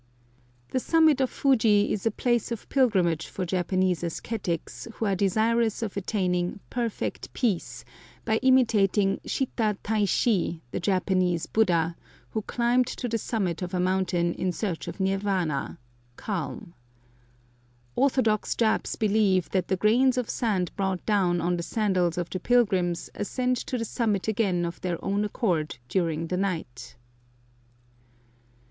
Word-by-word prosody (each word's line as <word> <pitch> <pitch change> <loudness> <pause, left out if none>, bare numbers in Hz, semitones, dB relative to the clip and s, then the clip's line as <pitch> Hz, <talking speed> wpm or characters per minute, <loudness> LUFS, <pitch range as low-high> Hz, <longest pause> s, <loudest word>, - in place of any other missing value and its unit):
The 255 - +1
summit 315 -1 +4
of 260 - +2
Fuji 220 -7 +3
is 210 +2 -2
a - - +5
place 240 +1 0
of 230 - -5
pilgrimage 190 - +2
for 185 - -4
Japanese 185 0 0
ascetics 175 +2 -4
who 225 - -2
are 200 -2 +1
desirous 220 +4 +1
of 210 - -4
attaining 180 -2 -1
"perfect 235 -3 -3
peace" 220 -9 -2 0.4
by 220 -1 +2
imitating 220 -6 +3
Shitta 220 -6 -1
Tai 215 -1 +1
shi, 185 -5 +1
the - - -2
Japanese 185 -2 +1
Buddha, 170 -6 +1 0.4
who 220 - -2
climbed 240 +3 +1
to 250 - -4
the 230 -1 -1
summit 195 -7 -2
of 180 +1 -3
a - - 0
mountain 180 -2 +1
in 185 - -1
search 180 -3 -3
of - - -7
nirvana 190 -6 -1 0.4
(calm). 170 - -5 1.2
Orthodox 255 -6 +2
Japs 220 -2 +1
believe 205 -4 +2
that 185 -2 0
the 190 - 0
grains 250 +6 +3
of 250 -2 -1
sand 195 -7 0
brought 190 -2 -2
down 185 -5 +2
on 175 +1 0
the - - -2
sandals 185 -4 0
of 175 -1 -1
the 185 - -3
pilgrims 190 -7 +1
ascend 250 +5 -1
to 250 - -3
the 230 - -2
summit 215 -4 -1
again 195 -5 +1
of 170 0 -6
their 175 -2 -2
own 200 +1 +1
accord 175 - -1
during 165 -1 0
the 180 +2 -2
night. 165 -13 -4
195 Hz, 140 wpm, -26 LUFS, 180-225 Hz, 1.2 s, a